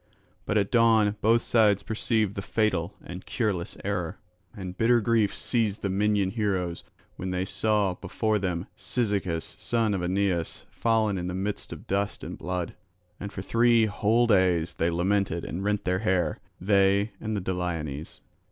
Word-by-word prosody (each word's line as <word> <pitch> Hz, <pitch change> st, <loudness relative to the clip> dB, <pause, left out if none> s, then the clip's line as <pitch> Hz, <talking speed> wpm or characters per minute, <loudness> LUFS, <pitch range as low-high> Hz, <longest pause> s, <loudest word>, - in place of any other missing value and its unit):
But 105 Hz, -, +1 dB
at 100 Hz, -1 st, +1 dB
dawn 110 Hz, -3 st, +4 dB
both 115 Hz, +2 st, +4 dB
sides 105 Hz, -4 st, +3 dB
perceived 110 Hz, -2 st, 0 dB
the 100 Hz, -, -4 dB
fatal 100 Hz, -4 st, 0 dB
and 90 Hz, +3 st, -7 dB
cureless 100 Hz, -8 st, -2 dB
error; 95 Hz, -2 st, -2 dB, 0.4 s
and 95 Hz, -2 st, -6 dB
bitter 120 Hz, +4 st, +4 dB
grief 115 Hz, -2 st, +2 dB
seized 110 Hz, -4 st, -1 dB
the 100 Hz, -, 0 dB
Minyan 100 Hz, -1 st, +1 dB
heroes 95 Hz, -6 st, -1 dB, 0.3 s
when 95 Hz, -, -4 dB
they 90 Hz, 0 st, -1 dB
saw 105 Hz, -1 st, +1 dB
before 105 Hz, +3 st, -1 dB
them 90 Hz, -2 st, -2 dB
Cyzicus 100 Hz, -8 st, -1 dB
son 115 Hz, -3 st, +1 dB
of 95 Hz, -, -1 dB
Aeneus 90 Hz, -2 st, -1 dB
fallen 110 Hz, -4 st, +1 dB
in 90 Hz, -, -3 dB
the 90 Hz, -, -3 dB
midst 100 Hz, +2 st, -3 dB
of -, -, -8 dB
dust 100 Hz, +1 st, -1 dB
and -, -, -5 dB
blood. 90 Hz, -1 st, -3 dB, 0.5 s
And 100 Hz, -, -6 dB
for 95 Hz, -, -6 dB
three 115 Hz, +1 st, +4 dB
whole 110 Hz, +3 st, +2 dB
days 90 Hz, -6 st, +3 dB
they 85 Hz, -, 0 dB
lamented 90 Hz, 0 st, 0 dB
and 90 Hz, +3 st, -4 dB
rent 105 Hz, 0 st, 0 dB
their 90 Hz, 0 st, +1 dB
hair, 90 Hz, -6 st, 0 dB, 0.2 s
they 100 Hz, +2 st, +3 dB
and 110 Hz, -1 st, -2 dB
the -, -, 0 dB
Dollones. 85 Hz, -5 st, -4 dB
100 Hz, 160 wpm, -27 LUFS, 90-110 Hz, 0.5 s, dawn